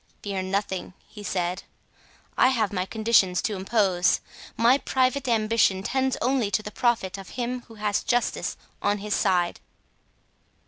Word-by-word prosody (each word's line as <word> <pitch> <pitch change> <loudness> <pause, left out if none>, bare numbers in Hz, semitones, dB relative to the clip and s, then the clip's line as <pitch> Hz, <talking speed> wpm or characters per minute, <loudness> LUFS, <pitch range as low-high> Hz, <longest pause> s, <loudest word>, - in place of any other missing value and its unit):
"Fear 195 -2 -2
nothing," 190 -1 -3
he 210 - -11
said; 180 -2 -2 0.7
"I - - +5
have 225 -6 +1
my 185 -1 -1
conditions 215 -5 +3
to 215 - -1
impose. 190 -2 +2 0.4
My 240 +4 +5
private 260 +1 0
ambition 215 -4 +2
tends 265 +3 0
only 250 -4 +1
to 205 +1 0
the 210 - -6
profit 205 -5 0
of 195 - -10
him 250 0 -2
who 225 - -13
has 210 -1 0
justice 245 -1 0 0.2
on 205 0 +1
his 210 +1 -3
side." 180 -3 +1
210 Hz, 145 wpm, -25 LUFS, 190-240 Hz, 0.7 s, I